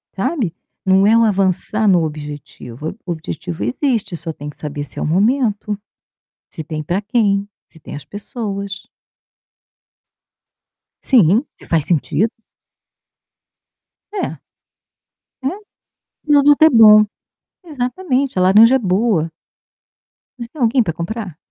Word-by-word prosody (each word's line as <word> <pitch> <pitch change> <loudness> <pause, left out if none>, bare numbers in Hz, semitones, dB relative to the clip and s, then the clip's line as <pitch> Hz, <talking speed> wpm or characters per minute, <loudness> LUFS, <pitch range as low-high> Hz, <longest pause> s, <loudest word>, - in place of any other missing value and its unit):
Sabe? 240 - -1 0.3
Não 190 +1 +4
é 225 +2 +5
o 230 - +4
avançar 205 +1 +1
no 180 -4 +4
objetivo, 150 -2 -7
o 180 - -4
objetivo 90 - -6
existe, 210 - -1
só 165 0 -5
tem 150 -1 -8
que 145 - -13
saber 145 -1 -5
se - - -10
é - - -4
o - - -1
momento, 210 - 0 0.7
se 160 - -7
tem 155 0 -5
para 175 +7 -2
quem, 205 -2 +1 0.2
se 160 - -19
tem - - -10
as 145 - -8
pessoas. 200 -2 -6 2.2
Sim, 225 - +4 0.2
se - - -16
faz 165 -3 +1
sentido. 170 +5 +1 1.8
É. 410 -2 -4 1.0
É. 260 - -2 0.8
Nada 290 -1 +6
tá 315 - +7
bom. 215 -2 +8 0.6
Exatamente, 275 - -2
a - - +3
laranja 215 +7 +6
é - - +2
boa. 190 -5 0 1.1
Mas 235 -1 -7
tem 300 +2 -10
alguém 240 +1 +3
para 165 - -3
comprar? 180 0 -5
200 Hz, 125 wpm, -18 LUFS, 165-235 Hz, 2.2 s, bom